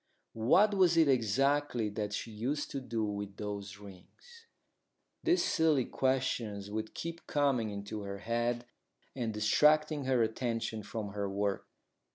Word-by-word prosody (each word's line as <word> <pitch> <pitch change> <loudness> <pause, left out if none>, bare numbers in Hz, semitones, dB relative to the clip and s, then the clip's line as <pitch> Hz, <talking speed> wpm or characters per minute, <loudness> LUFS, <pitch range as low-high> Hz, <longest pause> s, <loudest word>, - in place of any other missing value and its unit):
What 180 - +4
was 180 -4 +4
it 160 -2 +6
exactly 135 0 +2
that 105 0 -3
she 115 +2 -4
used 130 +7 -3
to 140 - -3
do 115 -3 -2
with 100 -1 -5
those 100 -1 -5
rings? 105 - -15 0.8
These 350 +2 +3
silly 155 -6 +3
questions 115 -6 -1
would 110 +1 -4
keep 170 0 -6
coming 135 -6 +1
into 100 +1 -5
her 100 0 -5
head 120 +3 -1 0.5
and 120 -4 -2
distracting 150 +7 +3
her 130 -3 +3
attention 115 -1 -2
from 105 +1 -5
her 100 0 -3
work. 100 0 -1
115 Hz, 140 wpm, -32 LUFS, 105-145 Hz, 0.8 s, it